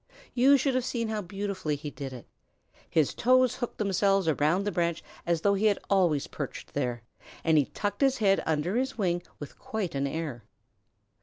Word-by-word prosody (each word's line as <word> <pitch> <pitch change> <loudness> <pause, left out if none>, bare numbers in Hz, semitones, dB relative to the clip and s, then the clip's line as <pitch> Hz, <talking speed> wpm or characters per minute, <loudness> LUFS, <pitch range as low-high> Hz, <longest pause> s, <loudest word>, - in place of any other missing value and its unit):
You 270 +3 +6
should 270 0 +1
have 255 0 +1
seen 230 -2 -2
how 215 -1 -2
beautifully 195 -4 -3
he 145 +1 -6
did 140 -2 -6
it. 125 -2 -9 0.6
His 155 -4 +2
toes 255 0 +3
hooked 240 - -4
themselves 195 -2 +2
around 160 +5 +2
the 205 - -1
branch 170 -3 -1 0.2
as 170 -2 +1
though 200 +2 +3
he 205 +2 +2
had 205 - +3
always 175 -7 +3
perched - - -7
there, 120 -2 -2 0.4
and 160 -1 +3
he 145 -3 +4
tucked 205 - -4
his 270 -1 +3
head 195 -3 +3
under 160 +7 0
his 260 0 -1
wing 175 -4 0 0.2
with 145 - -10
quite 215 -6 -3
an 140 0 0
air. 145 -6 -4
190 Hz, 185 wpm, -28 LUFS, 155-220 Hz, 0.6 s, You